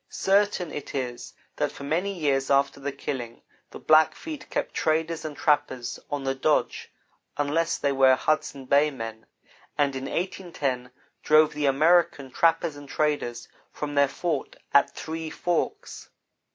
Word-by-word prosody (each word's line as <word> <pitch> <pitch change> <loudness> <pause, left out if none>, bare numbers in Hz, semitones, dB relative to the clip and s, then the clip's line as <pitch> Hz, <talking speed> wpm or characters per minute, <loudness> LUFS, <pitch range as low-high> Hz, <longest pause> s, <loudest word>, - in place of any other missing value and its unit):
Certain 195 -4 +1
it 145 - -7
is 125 -3 -4 0.2
that - - 0
for - - -10
many 170 +7 0
years 140 -7 0
after 140 0 +2
the 140 +1 -3
killing, 130 -4 -6 0.3
the - - -9
Blackfeet 160 - +2
kept - - -2
traders 160 +1 0
and 155 -2 -6
trappers 145 -5 0
on 145 -2 -3
the 135 0 0
dodge 150 +3 0 0.5
unless 155 +3 0
they 140 - 0
were 135 -1 +5
Hudson 140 -1 -1
Bay 145 +3 +4
men, 115 -5 -7 0.5
and 140 -2 +1
in 130 0 -4
1810 145 -8 -3 0.3
drove 155 0 +5
the 150 -1 0
"American" 150 -1 +3
trappers 165 +1 +2
and 145 -1 -11
traders 145 -6 -1 0.2
from 145 -1 -5
their 140 -1 +4
fort 160 0 -3 0.2
at 140 - +5
Three 160 0 -6
Forks. 175 +1 -3
145 Hz, 145 wpm, -26 LUFS, 135-160 Hz, 0.5 s, were